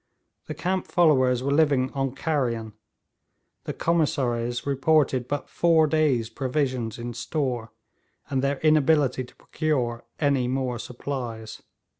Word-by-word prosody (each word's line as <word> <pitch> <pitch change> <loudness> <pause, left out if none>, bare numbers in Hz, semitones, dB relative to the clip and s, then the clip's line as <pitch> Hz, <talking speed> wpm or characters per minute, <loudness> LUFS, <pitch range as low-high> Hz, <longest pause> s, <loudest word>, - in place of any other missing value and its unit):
The - - -5
camp 185 0 -2
followers 130 -7 +3
were 140 - 0
living 140 -4 +3
on 135 -1 -2
carrion; 120 -8 -1 0.9
the - - -3
commissaries 125 -7 0
reported 140 -2 +2
but 145 0 -3
four 165 -2 +3
days' 150 -7 +1
provisions 130 -3 -2
in 120 0 -5
store, 125 -4 -3 0.6
and 135 -2 -1
their 140 +1 0
inability 155 -4 +3
to 125 - -15
procure 125 -7 -2 0.2
any 140 -4 +2
more 130 -2 -2
supplies. 120 -3 -6
135 Hz, 120 wpm, -25 LUFS, 120-150 Hz, 0.9 s, followers